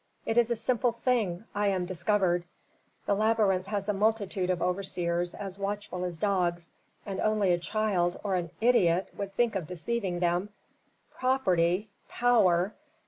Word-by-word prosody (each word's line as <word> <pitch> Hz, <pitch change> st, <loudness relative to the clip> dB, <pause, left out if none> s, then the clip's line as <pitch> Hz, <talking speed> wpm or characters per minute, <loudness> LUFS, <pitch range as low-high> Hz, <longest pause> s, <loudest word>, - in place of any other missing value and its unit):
It 225 Hz, -, -1 dB
is 240 Hz, -1 st, +4 dB
a 235 Hz, -, +1 dB
simple 240 Hz, +1 st, +1 dB
thing, 225 Hz, -6 st, 0 dB
I 205 Hz, 0 st, +1 dB
am 190 Hz, -2 st, 0 dB
discovered! 180 Hz, 0 st, +1 dB, 0.6 s
The -, -, +2 dB
labyrinth 205 Hz, -3 st, +2 dB
has 200 Hz, -1 st, -3 dB
a 210 Hz, -, +1 dB
multitude 200 Hz, -2 st, 0 dB
of 180 Hz, -2 st, +1 dB
overseers 175 Hz, -1 st, -1 dB
as 195 Hz, -1 st, -7 dB
watchful 200 Hz, -2 st, -3 dB
as 175 Hz, -2 st, -4 dB
dogs, 175 Hz, -3 st, 0 dB, 0.3 s
and 195 Hz, -2 st, -4 dB
only 210 Hz, -4 st, +2 dB
a 175 Hz, -, +1 dB
child, 190 Hz, -3 st, 0 dB
or 200 Hz, -2 st, -1 dB
an 175 Hz, -2 st, -1 dB
idiot, 190 Hz, -7 st, +3 dB
would 195 Hz, -1 st, -5 dB
think 240 Hz, 0 st, +2 dB
of 180 Hz, -5 st, -2 dB
deceiving 185 Hz, +1 st, -2 dB
them. 175 Hz, +3 st, 0 dB, 0.6 s
Property 190 Hz, -7 st, +1 dB, 0.2 s
power! 200 Hz, -6 st, +3 dB
195 Hz, 150 wpm, -29 LUFS, 180-215 Hz, 0.6 s, is